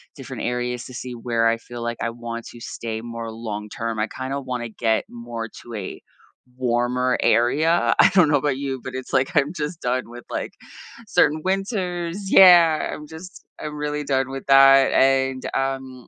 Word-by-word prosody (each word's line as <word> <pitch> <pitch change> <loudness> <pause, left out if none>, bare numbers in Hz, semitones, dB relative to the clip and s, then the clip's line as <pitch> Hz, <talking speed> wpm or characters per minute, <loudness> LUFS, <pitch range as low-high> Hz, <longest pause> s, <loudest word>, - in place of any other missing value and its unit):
different - - -7
areas 125 0 -2
to 130 - -11
see 125 0 -6
where 115 -1 0
I 115 0 +2
feel 120 +1 -10
like 120 0 -3
I 115 - -1
want 115 0 -7
to 120 - -12
stay 115 -1 -5
more 115 -1 -6
long 105 -2 -6
term. 115 -2 -4
I 110 - 0
kinda 135 +2 -4
wanna 125 -3 -4
get 110 0 0
more 115 -1 -6 0.2
to 120 - -10
a 95 -3 -6 0.6
warmer 125 0 0
area. 155 +8 +3
I - - +8
don't 180 -6 +5
know 145 - +4
about 140 -1 -1
you, 135 -2 -3
but 130 - -7
it's 130 - -6
like 135 +5 +2
I'm 145 +3 +2
just 155 +1 -5
done 125 +1 0
with, 120 0 -11
like, - - -4 0.5
certain 155 -4 +2
winters 190 -1 -2
Yeah. 170 -4 +7
I'm 150 0 -8
just 175 +4 -11 0.2
I'm 150 0 -5
really 150 0 -3
done 135 -1 0
with 135 -1 -6
that, 135 0 +7
and, 135 -1 +2
um, 135 -2 -3
130 Hz, 185 wpm, -22 LUFS, 120-150 Hz, 0.6 s, I